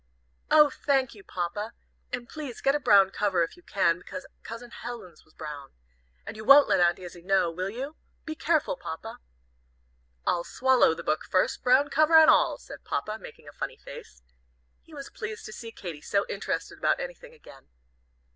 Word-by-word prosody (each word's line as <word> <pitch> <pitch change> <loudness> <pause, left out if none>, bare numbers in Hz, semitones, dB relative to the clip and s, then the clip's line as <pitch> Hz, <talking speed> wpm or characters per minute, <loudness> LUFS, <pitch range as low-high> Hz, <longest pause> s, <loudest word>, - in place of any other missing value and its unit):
"Oh, 300 -1 +6
thank 270 -3 0
you, 205 -3 -14
Papa! 190 +6 -4 0.4
And 245 -1 -4
please 290 -5 -7
get 275 - +2
a 295 - +1
brown 200 -7 +5
cover, 195 -5 +1
if 165 - -5
you 355 - -18
can, 180 - +1
because 275 +9 -8 0.2
Cousin 230 +1 -9
Helen's 230 -10 -9
was 155 - -28
brown. 150 -3 -8 0.5
And - - -7
you 215 - -8
won't 280 +5 +8
let - - +3
Aunt 175 -1 +4
Izzie 175 -2 -10
know, 185 -1 +2
will 185 +3 -3
you? 270 +8 -6 0.3
Be 315 - -4
careful, 315 - +1
Papa!" 160 -2 -8 1.1
"I'll 170 - +1
swallow 255 -9 +3
the - - -8
book 155 - 0
first, 185 - +1
brown 260 +3 +4
cover 310 +2 +5
and 315 - +8
all," - - +3
said - - -12
Papa, 215 +1 -3
making 150 - -13
a - - -9
funny - - -5
face. - - -12 0.6
He 320 - -16
was 275 -1 -8
pleased 215 0 -7
to 215 - -8
see 230 0 -8
Katy 175 -9 -8
so 200 +5 0
interested - - -4
about - - +2
anything - - -8
again. 135 - -16
220 Hz, 185 wpm, -27 LUFS, 180-280 Hz, 1.1 s, won't